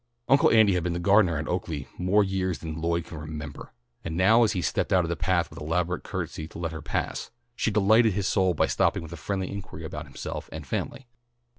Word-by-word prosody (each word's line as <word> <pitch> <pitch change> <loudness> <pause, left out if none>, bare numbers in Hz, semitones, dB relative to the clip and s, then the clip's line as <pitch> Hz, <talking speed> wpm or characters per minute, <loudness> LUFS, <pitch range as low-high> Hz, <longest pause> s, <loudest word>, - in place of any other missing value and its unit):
Uncle 135 - +5
Andy 110 -3 +5
had 90 - +1
been 85 +1 -1
the 85 - -2
gardener 95 -2 +4
at 80 - -4
Oaklea 80 -6 -3
more 95 +4 +3
years 95 -2 -1
than 80 -1 -6
Lloyd 85 0 0
could 80 - -8
remember, 75 -2 -7 0.3
and 80 0 -4
now 110 +6 +6
as 110 - +2
he 95 - -1
stepped - - -1
out 90 -2 +4
of - - -4
the 85 - 0
path 90 -1 0
with - - -10
elaborate 85 +3 -1
courtesy 80 - -5
to - - -11
let 85 -1 -3
her 80 -1 -6
pass, - - -3 0.3
she 115 - 0
delighted 110 +2 +4
his 100 0 -1
soul 95 -3 +2
by - - +3
stopping - - +1
with 80 +1 -8
a - - -5
friendly 95 +5 -3
inquiry 100 -5 -7
about 75 0 -6
himself 70 - -6
and - - -7
family. 135 - -4
90 Hz, 230 wpm, -27 LUFS, 80-100 Hz, 0.3 s, now